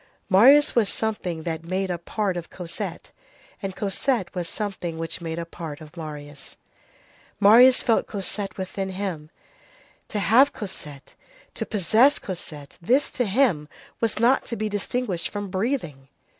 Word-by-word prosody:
—Marius 265 +10 +7
was 225 -4 +3
something 185 -7 -2
that 165 -1 -3
made 185 +2 -2
a 175 - -3
part 195 +2 -2
of 175 -1 -6
Cosette, 175 -2 -6 0.5
and 195 -2 -4
Cosette 205 +2 -1
was 175 -3 -3
something 190 -6 -4
which 165 +2 -4
made 165 -1 -4
a 170 - -3
part 160 -3 -7
of 155 0 -13
Marius. 150 -3 -8 0.8
Marius 240 +5 +7
felt 230 - +2
Cosette 200 0 -3
within 190 0 -4
him. 185 -5 -4 0.8
To 215 - -4
have 245 +8 +5
Cosette, 150 -9 -8 0.4
to - - -4
possess 220 - +4
Cosette, 150 -6 -8
this, 255 +11 +2
to 245 - 0
him, 195 - +2 0.3
was 230 -2 0
not 245 +4 +4
to 235 - -4
be 215 -1 -2
distinguished 205 -2 -2
from 205 -2 -5
breathing. 185 - -2
190 Hz, 145 wpm, -24 LUFS, 165-220 Hz, 0.8 s, Marius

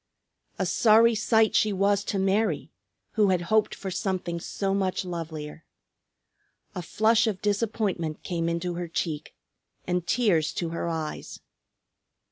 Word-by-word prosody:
A - - 0
sorry 230 +1 +5
sight 220 0 +3
she 215 - +3
was 200 +1 +2
to 200 - -2
Mary, 195 +3 0 0.4
who 210 -3 +3
had 180 -2 +2
hoped 220 -1 +3
for 190 - -6
something 185 -2 -2
so 195 +3 -2
much 190 -1 -1
lovelier. 160 -3 -6 1.1
A 180 - -4
flush 220 +7 +2
of 205 -4 -1
disappointment 205 -6 -1
came 170 -2 -1
into 170 +1 -2
her 175 0 -4
cheek, 160 -2 -4 0.5
and 180 -1 -1
tears 195 -10 +2
to 170 - -2
her 170 +1 -3
eyes. 160 -2 -5
190 Hz, 135 wpm, -26 LUFS, 170-210 Hz, 1.1 s, sorry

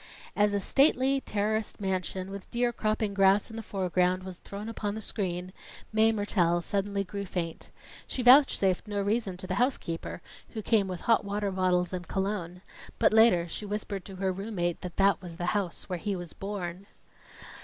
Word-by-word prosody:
As 205 -1 +3
a - - +2
stately, 270 +4 +3
terraced 215 +1 -1
mansion, 190 -1 -2
with 200 -1 -8
deer 240 0 0
cropping 215 -2 -1
grass 195 +2 +4
in - - -8
the 225 - -4
foreground, 185 -2 0
was 185 -2 -8
thrown 200 +2 -7
upon 210 -2 -3
the - - -4
screen, 185 -3 -3 0.4
Mae 220 +1 +5
Mertelle 175 -5 +1
suddenly 200 0 -1
grew 200 +1 -5
faint. 170 -3 -4 0.4
She 255 - -3
vouchsafed 245 -8 +5
no 205 -1 -2
reason 200 -2 0
to 185 - -7
the 185 - -3
housekeeper 175 -11 -2 0.3
who 220 - -3
came 210 -3 +3
with 180 -2 -5
hot 230 - +3
water 200 0 -2
bottles 180 -1 +1
and 180 -1 -4
cologne; 190 -2 -3 0.3
but - - +4
later, 220 -6 +5
she 170 - -4
whispered 205 -2 -4
to 195 - -8
her 190 0 0
room 200 +4 -6
mate 175 -1 -1
that 180 -2 -7
that 195 0 +3
was 175 -3 -8
the 175 - -3
house 200 -5 -2
where 180 -3 -3
he 200 +3 -2
was 175 -3 -6
born. 195 -1 -5
195 Hz, 185 wpm, -29 LUFS, 180-215 Hz, 0.4 s, Mae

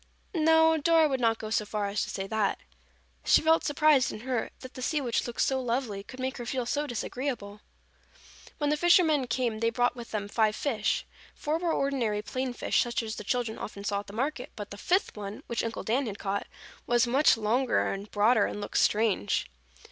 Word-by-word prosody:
No, 320 -1 +4
Dora 320 +1 +4
would 265 -3 -1
not 225 -2 +2
go 215 -1 -7
so 220 - +2
far 210 0 -3
as 200 +1 -1
to - - -3
say 195 - -4
that. 210 0 0 0.7
She - - +5
felt 320 +1 +3
surprised 295 -2 +3
and 215 - -8
hurt, 250 -3 -2
that 255 - -10
the 255 - -8
sea 300 +4 0
which 245 -4 -1
looked 240 - -3
so 265 -1 +1
lovely, 235 -4 -2
could 255 +6 -12
make 260 0 -3
her 240 - -6
feel 255 0 -2
so 295 +5 -1
disagreeable. 240 -4 -4 1.0
When 295 -1 0
the 300 - +1
fishermen 320 -5 +4
came 235 -2 -1
they 230 0 +2
brought 245 +2 +1
with 235 -2 -9
them 205 -2 -3
five 215 0 +1
fish. 220 -6 -1 0.3
Four 305 +2 -1
were 345 -1 0
ordinary 240 -9 0
plain 255 +3 -3
fish - - +1
such 240 -1 -1
as 220 0 -5
the - - -6
children 235 0 -2
often 200 -1 -7
saw 200 -1 -1
at 205 - -9
the 200 - -10
market, 260 +3 -3
but 205 -1 -7
the 200 - -7
fifth 370 - +1
one, 205 0 -7
which 235 - -2
Uncle 225 -1 -4
Dan 250 +4 0
had 205 -2 -5
caught, 200 0 -3 0.4
was 240 +1 +3
much 260 +2 +4
longer 235 +4 +1
and 200 +1 -7
broader 215 +1 +3
and - - -5
looked 205 - -1
strange. 210 - +2
240 Hz, 210 wpm, -28 LUFS, 215-275 Hz, 1.0 s, She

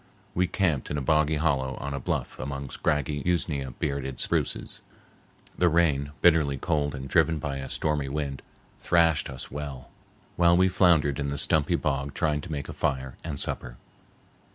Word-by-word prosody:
We 90 +1 +2
camped 85 -8 0
in 75 - -2
a - - -1
boggy 75 +1 +2
hollow 70 -4 0
on 70 +1 -5
a 70 - -2
bluff - - -3
among 70 0 -5
scraggy, 75 -1 -1
usnea 75 -6 0
bearded 70 -2 -3
spruces. - - -2 0.7
The 90 - +3
rain, 75 -4 +2
bitterly 80 -5 +4
cold 75 -1 0
and 65 0 -6
driven 80 +3 +3
by 70 -2 -3
a 65 0 -6
stormy 75 -3 -1
wind, 70 -1 -3 0.4
thrashed 85 -4 +3
us 65 -2 -7
well 70 -3 -6 0.5
while 85 0 +5
we 95 +1 +4
floundered 80 -6 +3
in 70 - -1
the 70 0 -2
stumpy - - +2
bog 70 +1 -2
trying 75 -3 +1
to - - -8
make 70 -2 -4
a - - -6
fire 65 -1 -2
and 75 -4 -4
supper. - - -3
75 Hz, 170 wpm, -27 LUFS, 70-80 Hz, 0.7 s, while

